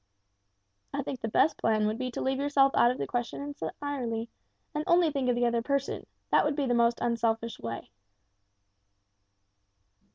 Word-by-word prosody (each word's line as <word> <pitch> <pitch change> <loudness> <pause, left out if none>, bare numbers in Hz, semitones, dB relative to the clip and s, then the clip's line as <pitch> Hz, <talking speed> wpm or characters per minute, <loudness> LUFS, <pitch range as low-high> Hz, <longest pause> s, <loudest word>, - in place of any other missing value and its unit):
"I - - -1
think 255 - -5
the 225 - -2
best 295 +8 +3
plan 215 -1 +2
would 215 +2 -1
be 255 -1 -2
to 245 - -5
leave 265 0 0
yourself 280 -1 +4
out 240 - +5
of 250 - -1
the - - -2
question 245 -1 -3
entirely, 280 -5 -4 0.4
and 300 0 -1
only 345 -2 +4
think 270 -3 0
of 245 - +3
the 240 0 +2
other 235 -1 +1
person; 280 +2 -2 0.2
that - - +5
would 295 -1 0
be 285 - 0
the 245 - +1
most 235 0 +3
unselfish 230 -1 0
way." 115 0 -6
245 Hz, 170 wpm, -29 LUFS, 230-280 Hz, 0.4 s, out